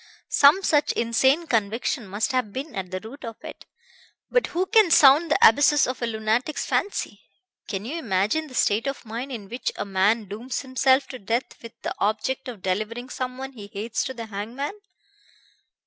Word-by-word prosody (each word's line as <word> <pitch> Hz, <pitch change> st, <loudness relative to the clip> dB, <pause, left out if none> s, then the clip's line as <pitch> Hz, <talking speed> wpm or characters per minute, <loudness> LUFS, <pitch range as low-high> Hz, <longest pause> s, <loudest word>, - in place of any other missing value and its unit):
Some 295 Hz, +8 st, +5 dB
such 295 Hz, -5 st, +2 dB
insane 265 Hz, +8 st, +2 dB
conviction 230 Hz, 0 st, -1 dB
must 205 Hz, +8 st, -1 dB
have 255 Hz, -5 st, -1 dB
been 275 Hz, +6 st, -6 dB
at 190 Hz, -2 st, -4 dB
the 185 Hz, 0 st, -4 dB
root 235 Hz, +8 st, -11 dB
of 230 Hz, -2 st, -6 dB
it. -, -, -10 dB, 0.6 s
But -, -, +2 dB
who 360 Hz, +2 st, -1 dB
can 435 Hz, -2 st, +4 dB
sound 305 Hz, +1 st, +6 dB
the -, -, +3 dB
abysses 285 Hz, +5 st, +4 dB
of 255 Hz, 0 st, -4 dB
a 235 Hz, -, 0 dB
lunatic's 220 Hz, +6 st, -1 dB
fancy? 405 Hz, -, -2 dB, 0.5 s
Can 200 Hz, -1 st, -4 dB
you 310 Hz, +8 st, -4 dB
imagine 215 Hz, -, 0 dB
the 255 Hz, -, -11 dB
state 215 Hz, +4 st, +2 dB
of 275 Hz, -2 st, -4 dB
mind 235 Hz, +5 st, -5 dB
in 215 Hz, -6 st, -6 dB
which 240 Hz, +5 st, -3 dB
a -, -, -4 dB
man 200 Hz, +3 st, +2 dB
dooms 230 Hz, +6 st, -5 dB
himself 260 Hz, +1 st, +2 dB
to 255 Hz, -, -7 dB
death 230 Hz, +5 st, -3 dB
with 230 Hz, -1 st, -12 dB
the -, -, -2 dB
object 220 Hz, +6 st, -1 dB
of 230 Hz, -7 st, -8 dB
delivering 215 Hz, +6 st, -2 dB
someone 260 Hz, +1 st, -5 dB
he 215 Hz, -6 st, -10 dB
hates 210 Hz, +3 st, -3 dB
to 260 Hz, -, -5 dB
the 230 Hz, -1 st, -6 dB
hangman?" 225 Hz, -, -5 dB
245 Hz, 180 wpm, -24 LUFS, 215-275 Hz, 0.6 s, sound